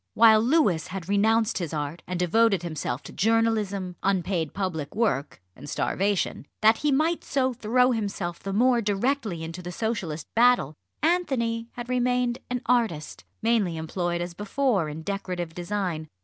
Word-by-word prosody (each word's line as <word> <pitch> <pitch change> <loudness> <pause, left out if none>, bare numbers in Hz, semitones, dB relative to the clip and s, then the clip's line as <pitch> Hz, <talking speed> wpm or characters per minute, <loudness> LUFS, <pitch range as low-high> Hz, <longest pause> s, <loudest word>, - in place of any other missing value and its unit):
While 220 -1 +7
Louis 235 - +2
had 185 -3 -6
renounced 220 +2 +2
his 165 -3 -3
art, 150 +3 -4
and 180 -1 -3
devoted 195 +1 +3
himself 150 -6 -3
to - - -10
journalism, 210 -4 +1
unpaid 180 -4 0
public 180 -7 -3
work 150 - 0 0.2
and 145 +3 -10
starvation, 195 -5 -1
that 220 +1 +6
he 300 - +1
might 315 +5 +1
so 260 -2 0
throw 250 +2 +2
himself 200 -6 -3
the 195 - -5
more 240 +4 +3
directly 210 - -1
into 165 +2 -6
the 175 0 -6
Socialist 180 -8 -3
battle, 240 - +4 0.3
Anthony 255 -10 +1
had 240 -1 -7
remained 250 0 +1
an 250 -1 -2
artist, 225 -11 0 0.2
mainly 215 -7 +2
employed 175 +2 -2
as 175 0 -4
before 205 - 0
in 155 +2 -7
decorative 180 -3 -4
design. 175 -3 -3
200 Hz, 150 wpm, -26 LUFS, 175-235 Hz, 0.3 s, While